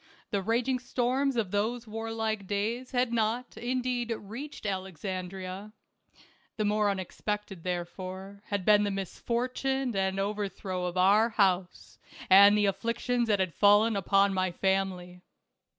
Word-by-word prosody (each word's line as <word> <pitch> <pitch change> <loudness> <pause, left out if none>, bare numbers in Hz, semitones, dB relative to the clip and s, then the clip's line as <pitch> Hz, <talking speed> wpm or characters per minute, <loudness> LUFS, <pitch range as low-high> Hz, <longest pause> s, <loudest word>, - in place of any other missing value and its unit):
The 200 - 0
raging 240 +5 0
storms 255 +2 0
of 215 -6 -1
those 225 +4 -1
warlike 220 -2 -3
days 225 +6 -2
had 245 -1 0
not, 230 +2 -1
indeed, 245 -1 -2
reached 235 +7 -8
Alexandria; 190 +1 -5 0.8
the 215 - 0
more 210 0 +2
unexpected, 195 -1 -4
therefore, 185 +2 -5
had 200 -3 -2
been 210 -1 +5
the 205 - 0
misfortune 245 +6 -2
and 190 0 0
overthrow 195 -2 -3
of 180 0 -3
our 205 +5 +5
house 190 -4 0 0.3
and 200 +2 +8
the 205 - +3
afflictions 230 +4 0
that 205 -2 +2
had 185 -3 0
fallen 205 +5 +5
upon 195 +1 +3
my 185 -1 0
family. 185 -1 -1
205 Hz, 130 wpm, -29 LUFS, 190-230 Hz, 0.8 s, and